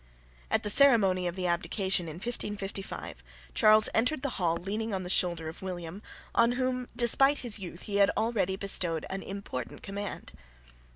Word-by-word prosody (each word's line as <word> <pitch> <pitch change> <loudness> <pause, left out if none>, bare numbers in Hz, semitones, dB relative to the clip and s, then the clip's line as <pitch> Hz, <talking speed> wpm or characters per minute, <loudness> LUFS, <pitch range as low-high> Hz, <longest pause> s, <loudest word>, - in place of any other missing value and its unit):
At - - 0
the 210 - +2
ceremony 205 -9 +5
of 175 - -4
the 185 -1 -4
abdication 180 +1 0
in 155 - -7
1555, 195 - -5 0.3
Charles 215 0 +5
entered 250 +5 0
the 280 - -1
hall 165 -2 +1
leaning 210 +4 -4
on 185 - -4
the 180 - -2
shoulder 170 -4 +2
of 160 - -9
William, 180 0 -7 0.3
on 235 +1 +3
whom, 255 -1 -2
despite 270 +4 +4
his 225 -3 0
youth, 175 -2 -9
he 200 -1 -3
had 200 -1 +4
already 215 -4 0
bestowed 180 -5 +2
an 195 0 -4
important 195 -11 -7
command. 200 0 -6
195 Hz, 165 wpm, -28 LUFS, 180-225 Hz, 0.3 s, ceremony